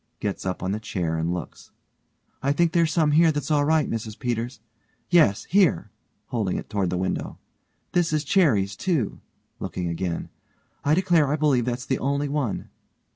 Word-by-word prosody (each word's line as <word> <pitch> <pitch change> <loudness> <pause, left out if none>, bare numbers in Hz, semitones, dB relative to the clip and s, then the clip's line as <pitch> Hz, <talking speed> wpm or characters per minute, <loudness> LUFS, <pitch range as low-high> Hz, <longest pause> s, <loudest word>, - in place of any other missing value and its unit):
(gets 100 -2 -3
up 90 - -3
on 95 - -1
the 105 - -2
chair 90 -6 -2
and 80 +1 -1
looks) 90 -3 -6 0.7
I 140 +2 +2
think 170 +2 +2
there's 165 -2 +2
some 155 -3 +2
here 160 +2 +5
that's 145 -1 -3
all 145 -1 +3
right, 155 -1 +3
Mrs 110 -1 -4
Peters. 120 0 -3 0.5
Yes 155 - +4
here; 180 - +2 0.4
(holding 110 -8 -1
it - - -7
toward 100 -4 0
the 90 - -1
window) 95 +1 -2 0.5
this 175 -2 +2
is 155 -1 +1
cherries, 135 - +2
too. 155 - -1 0.4
(looking 90 -1 -3
again) 85 0 -3 0.5
I 145 +2 +3
declare 175 -5 +3
I - - +2
believe 145 -6 +2
that's 125 0 -3
the 130 - -1
only 140 +2 0
one. 140 -8 -2
130 Hz, 175 wpm, -25 LUFS, 100-155 Hz, 0.7 s, here